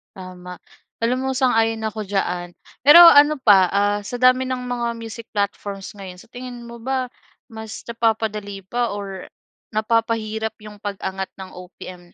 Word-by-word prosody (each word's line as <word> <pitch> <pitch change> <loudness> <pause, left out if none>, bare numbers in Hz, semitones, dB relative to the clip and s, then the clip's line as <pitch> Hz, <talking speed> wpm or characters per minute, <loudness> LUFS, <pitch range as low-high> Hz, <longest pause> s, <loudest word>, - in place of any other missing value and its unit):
Tama. 180 -1 -10 0.4
Alam 250 +3 0
mo, - - 0
sang-ayon 225 -4 +2
ako 215 0 -6
diyan. 180 -3 -2 0.3
Pero 300 +4 +10
ano 295 -2 +8
pa, 195 -6 +6
ah, 205 +1 +2
sa 245 - -5
dami 255 +1 +5
ng 255 -1 -3
mga 245 -1 -3
music 230 0 -9
platforms 200 -1 -3
ngayon, 185 -2 -10
sa - - -20
tingin 245 -1 -8
mo 235 0 -10
ba 260 +1 -2 0.4
mas 220 -1 -8
napapadali 220 -3 -2
pa 240 +3 -2
or 195 -2 -7 0.5
napapahirap 220 0 -1
yung 210 -1 -11
pag-angat 190 -2 -4
ng 190 -1 -9
OPM 180 -1 -11
220 Hz, 150 wpm, -21 LUFS, 195-240 Hz, 0.5 s, Pero